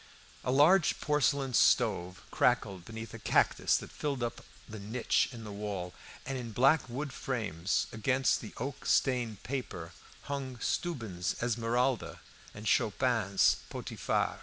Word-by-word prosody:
A 125 - 0
large 155 +6 +5
porcelain 145 -3 +1
stove 95 -7 +3
crackled 100 -7 +1
beneath 115 0 -8
a 115 - -7
cactus - - +3
that - - -8
filled 140 -4 -3
up 120 - -4 0.2
the 110 0 -8
niche 110 +5 +1
in 115 -3 -9
the 105 - -7
wall, 100 -3 -4 0.3
and 135 -1 -3
in 115 -3 -6
black 135 +4 +4
wood 135 +3 -4
frames 105 -9 -1
against 130 +4 +1
the 110 - -9
oak 135 +3 -5
stained 120 -6 +1
paper 120 -11 -5 0.3
hung 135 -3 -4
Steuben's 115 - -2
"Esmeralda" 120 +2 0 0.3
and 105 +1 -8
Schopin's 105 -2 +3
"Potiphar." - - -2
120 Hz, 135 wpm, -31 LUFS, 105-135 Hz, 0.3 s, large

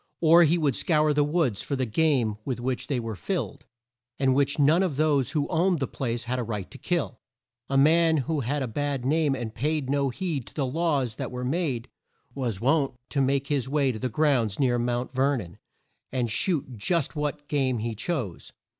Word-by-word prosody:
Or 170 +1 +7
he 165 +3 +3
would 145 -6 +1
scour 155 -2 +2
the 145 0 +3
woods 150 - 0
for 140 - -3
the 130 -1 0
game 120 -3 +1
with 125 -1 -3
which 125 +1 -2
they 135 -4 0
were 115 -2 -4
filled, 145 - -4 0.5
and 135 -1 +2
which 140 +1 +1
none 155 +5 +4
but 175 -8 -1
those 145 -5 +2
who 150 -3 0
owned 180 +1 +2
the 135 - 0
place 120 -3 -3
had 125 +2 -2
a - - -1
right 105 -5 -5
to - - -10
kill. - - -2 0.5
A 135 - +1
man 160 +3 +5
who 160 -1 -1
had 140 +3 -1
a - - -2
bad 140 +2 -2
name 150 0 +2
and 120 -4 -5
paid 145 +1 -1
no 140 -1 +1
heed 145 -1 -3
to - - -12
the 140 - 0
laws 140 -5 0
that - - -3
were 125 0 -5
made, 135 -5 -1 0.5
was 120 -7 -3
wont 135 +2 +1
to 140 - 0
make 135 +1 +1
his 135 -3 0
way 140 -2 +2
to 110 - -6
the 130 - -2
grounds 120 -6 +1
near 125 -3 +2
Mount 120 +1 -2
Ver 135 +2 +2
non 85 -7 -8 0.5
and 125 -3 -1
shoot 145 - 0
just 165 - 0
what 150 0 -3
game 135 -4 +1
he 115 +1 -3
chose. 115 - -4
135 Hz, 210 wpm, -26 LUFS, 125-150 Hz, 0.5 s, Or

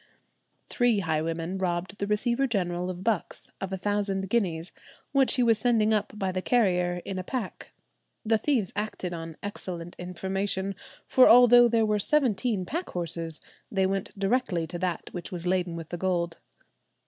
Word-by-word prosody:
Three 240 -5 +2
highwaymen 165 +2 -2
robbed 180 +1 -2
the 200 - -1
Receiver 235 +5 +1
General 180 -5 -1
of 185 0 -6
Bucks 220 -5 0
of 195 -1 -4
a 190 - -2
thousand 195 -1 -1
guineas, 180 -7 0 0.4
which 275 -2 +3
he 250 - +2
was 230 -2 +4
sending 220 -2 +3
up 210 -1 0
by 190 -3 -1
the 185 0 -2
carrier 180 -6 +1
in 190 -1 -4
a - - -4
pack; 235 -1 -5 0.5
the 220 0 +3
thieves 230 -7 0
acted 205 -4 -3
on 165 -1 -7
excellent 175 -4 -6
information, 190 +2 -2 0.3
for 255 - +6
although 240 0 +8
there 230 -1 +2
were 210 -1 +1
seventeen 230 -6 +1
pack 340 - -4
horses, 165 -2 -3 0.3
they 190 -2 +2
went 195 0 -1
directly 195 -4 0
to 175 +2 -5
that 180 -1 -2
which 175 -2 -6
was 175 -1 -5
laden 180 -1 0
with 165 -2 -7
the 175 - -4
gold. 170 -2 -1
190 Hz, 165 wpm, -27 LUFS, 175-220 Hz, 0.5 s, although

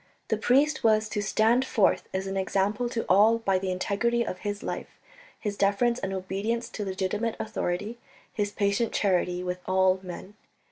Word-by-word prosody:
The 220 - +1
priest 275 +7 +2
was 220 -1 +4
to 210 - -2
stand 220 +5 +3
forth 220 -6 +1
as 190 0 -2
an 195 0 -4
example 200 +5 0
to 230 -1 -3
all 215 +4 +5
by 195 -5 +1
the 190 0 -3
integrity 230 +6 0
of 185 - -5
his 205 0 -4
life, - - -6 0.4
his 205 -2 -3
deference 205 +5 +2
and 195 - -3
obedience 195 +5 -2
to 210 - -5
legitimate 200 +4 -2
authority, 210 +1 -3 0.3
his 205 -1 -1
patient 200 +3 0
charity 180 -2 +1
with 180 0 -3
all 185 0 +3
men. 185 +2 -8
205 Hz, 170 wpm, -27 LUFS, 190-225 Hz, 0.4 s, all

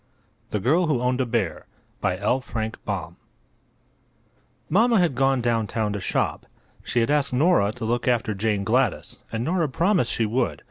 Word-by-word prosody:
THE 105 - -1
GIRL 160 - +2
WHO 145 -5 +1
OWNED 125 +1 0
A - - +1
BEAR 115 -7 -2 3.0
Mamma 230 +4 +3
had 175 -5 +2
gone 135 0 +2
down 115 -2 0
town 110 -2 -1
to 100 - -3
shop. - - -1 0.4
She 120 - 0
had 115 - +1
asked 145 -3 +1
Nora 135 - +3
to 120 -1 -6
look 120 +3 -1
after 115 -3 +1
Jane 105 0 -1
Gladys, - - 0
and 115 +1 -2
Nora 165 +1 0
promised 170 - +1
she 115 - 0
would. 120 +4 -1
125 Hz, 150 wpm, -24 LUFS, 110-150 Hz, 3.0 s, Mamma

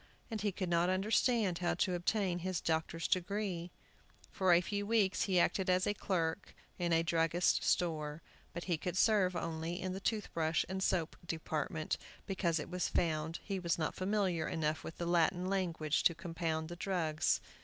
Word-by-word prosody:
And 220 -2 -3
he 205 -1 +1
could 185 0 -3
not 170 +1 +2
understand 200 0 +2
how 175 - +1
to 185 - +1
obtain 180 0 0
his 185 0 -2
doctor's 160 0 -1
degree. 185 -1 -1 0.6
For 190 -2 +2
a 170 - +7
few 205 +3 -2
weeks 210 -4 +2
he 185 -3 +3
acted 185 +2 +2
as 185 0 +3
clerk 170 -1 -1 0.2
in 175 -1 0
a 165 0 +4
druggist's 165 +1 +2
store. 155 -3 0 0.3
But 170 +1 -5
he 175 -3 0
could 180 +1 -3
serve 190 -4 +4
only 165 +1 -3
in 185 0 -3
the 190 - -4
toothbrush 170 -7 0
and 190 0 -3
soap 175 -4 0
department, 160 -1 -2 0.3
because 180 -4 0
it 150 - -5
was 180 0 0
found 160 -1 0
he 195 -2 -3
was 170 -2 0
not 160 -2 -1
familiar 185 -4 0
enough 155 -1 -1
with 165 - -7
the 170 - -3
Latin 175 +1 +2
language 170 -6 0
to 170 - +5
compound 165 -1 -3
the 175 - -6
drugs. 170 -4 0
175 Hz, 175 wpm, -34 LUFS, 165-190 Hz, 0.6 s, a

